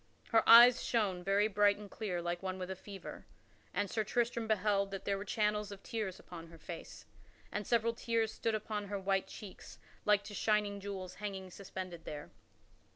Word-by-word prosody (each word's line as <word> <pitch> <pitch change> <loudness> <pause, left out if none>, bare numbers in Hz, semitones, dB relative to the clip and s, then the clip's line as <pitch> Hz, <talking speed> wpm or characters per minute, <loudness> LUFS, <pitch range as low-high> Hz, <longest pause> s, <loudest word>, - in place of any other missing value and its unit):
Her 225 - +5
eyes 240 +2 +10
shone 195 -6 0
very 200 +3 +3
bright 205 -1 +4
and 210 0 -9
clear 190 -4 -3
like 175 0 -2
one 190 -1 -3
with 185 0 -5
a - - -3
fever, 195 +1 -9 0.4
and 205 - 0
Sir 220 +2 -1
Tristram 235 +1 0
beheld 200 -2 +2
that 195 -1 -6
there 200 - +1
were 195 - -4
channels 210 0 0
of 200 -1 -9
tears 210 -5 -3
upon 165 -2 -10
her 165 0 -13
face 165 +2 -9 0.5
and 210 - -3
several 230 -1 +2
tears 230 -1 0
stood 225 -1 -1
upon 210 -1 -3
her 200 0 -3
white 195 0 0
cheeks 205 -3 -10 0.3
like 210 -1 +4
to 210 - -9
shining 210 -1 +1
jewels 190 -2 -6
hanging 190 -3 -5
suspended 185 -3 -7
there. 150 0 -7
200 Hz, 185 wpm, -34 LUFS, 190-215 Hz, 0.5 s, eyes